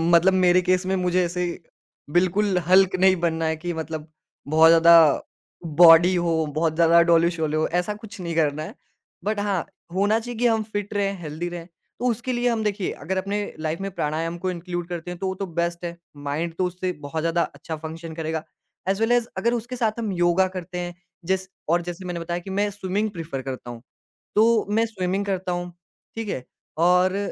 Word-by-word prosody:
मतलब 185 +3 +5
मेरे 180 -1 +4
केस 185 +1 +1
में 190 +1 0
मुझे 180 0 +1
ऐसे 180 +1 -2 0.7
बिल्कुल 185 +3 +2
हल्क 185 +1 +5
नहीं 190 0 +5
बनना 165 -1 0
है 160 0 0
कि 175 +2 -4
मतलब 160 -1 -5 0.4
बहुत 160 +2 +6
ज़्यादा 165 0 +8 0.8
बॉडी 170 +2 +8
हो, 165 -2 +1
बहुत 155 +2 -1
ज़्यादा 170 +1 +5
डोले-शोले 165 -2 +2
हो, 155 - +1
ऐसा 180 +4 -1
कुछ 210 0 -11
नहीं 170 -2 -4
करना 155 -1 +1
है। 155 - -8 0.5
बट 210 +1 -1
हाँ, 200 -4 -1 0.3
होना 205 +4 +2
चाहिए 240 0 -7
कि 245 - +1
हम 225 -2 +2
फिट 205 +1 -3
रहें, 200 -1 0
हेल्दी 160 +2 -4
रहें, 175 -1 -7 0.3
तो 245 - -2
उसके 240 +2 -2
लिए 245 0 +1
हम 225 -2 0
देखिए 205 -2 -1
अगर 190 +4 -1
अपने 200 +2 -1 0.2
लाइफ़ 155 +3 -3
में 195 - -3
प्राणायाम 165 +1 -2
को 185 - 0
इनक्लूड 175 0 -5
करते 175 0 -5
हैं, 180 - -6
तो 190 - -2
वो 190 - -2
तो - - 0
बेस्ट 170 0 -1
है, 170 0 -5 0.2
माइंड 145 +4 -3
तो 185 - +1
उससे 180 +1 -2
बहुत 155 +2 -4
ज़्यादा 165 +1 +1
अच्छा 160 - -6
फंक्शन 160 +1 -7
करेगा। 160 -1 -3 0.5
एज 195 +1 +1
वेल 225 +1 +2
एज 240 -1 +3
अगर 235 +1 +1
उसके 240 +1 -3
साथ 230 -2 -1
हम 220 -3 -2
योगा 175 +1 +3
करते 180 0 -6
हैं, 175 0 -5 0.3
जैस 190 +1 -1 0.2
और 170 +1 +3
जैसे 175 +2 -7
मैंने 175 -1 -4
बताया 170 +1 -3
कि 175 - -10
मैं 205 0 +2
स्विमिंग 205 +2 -2
प्रेफर 150 -5 -4
करता 130 -2 -6
हूँ, 120 -1 -8 0.5
तो 225 +1 +4
मैं 220 +2 +2
स्विमिंग 195 -2 -2
करता 190 -2 -2
हूँ, 175 0 -3 0.4
ठीक 225 -2 -4
है। 130 - -3 0.3
और, 180 +3 +3
180 Hz, 200 wpm, -24 LUFS, 165-195 Hz, 0.8 s, ज़्यादा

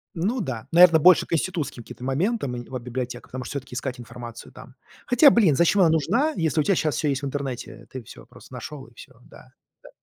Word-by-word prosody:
Ну 210 +9 -1
да. 125 - -5
Наверно, 170 -1 +7
больше 180 +3 +6
к - - -5
институтским 160 -7 -2
каким-то 125 - -12
моментам, 140 - -1
нед 120 0 -8
вот 130 -2 -5
библиотека, 125 0 -6
потому 130 0 -7
что - - -8
всё-таки 135 -3 -7
искать 130 0 -4
информацию 120 0 -10
там. - - -14 0.3
Хотя, 260 +4 +6
блин, 205 - +3
зачем 170 +6 +3
она 170 - +5
нужна, 230 - +1
если 160 -1 0
у - - 0
тя 195 - +2
щас 155 -5 0
всё 150 - -1
есть 135 -1 -1
в - - -4
интернете, 130 -4 -6
ты 130 -2 -7
всё - - -14
просто - - -17
нашел, 145 -3 -8
и 120 - -21
всё, 130 +2 -14
да, 130 - -17 0.3
да. - - -14
140 Hz, 225 wpm, -24 LUFS, 125-170 Hz, 0.3 s, Наверно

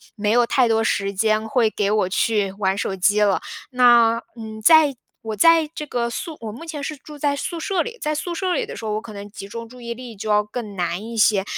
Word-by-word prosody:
没 210 -1 -1
有 240 +2 +4
太 250 0 +3
多 225 0 +2
时 200 -2 0
间 215 +2 +1
会 230 -3 +3
给 205 -1 0
我 210 -3 +1
去 205 -1 +1
玩 190 0 +1
手 195 - -2
机 205 +3 +2
了。 200 -2 +3 0.3
那， 240 -2 +5 0.2
嗯， 220 -1 -8
在 305 +1 +6 0.3
我 220 -1 -4
在 330 +6 +5
这 300 -2 -6
个 235 -2 -1
宿 305 +6 -5
我 220 -2 -6
目 245 +10 -10
前 300 -3 -6
是 305 - -4
住 300 +2 -12
在 285 0 0
宿 335 +4 -4
舍 365 +1 0
里， 470 0 -5
在 305 -1 -1
宿 340 +3 -3
舍 370 -1 -1
里 - - 0
的 - - -7
时 225 - -7
候， 210 - -1
我 215 - -2
可 215 - -10
能 200 0 -8
集 195 - -9
中 230 +2 -7
注 250 +1 -14
意 235 0 -5
力 245 -3 -9
就 215 +2 -6
要 210 0 +4
更 210 -1 -7
难 175 +2 -2
一 230 0 -7
些。 210 -2 +4
225 Hz, 270 characters per minute, -22 LUFS, 210-280 Hz, 0.3 s, 在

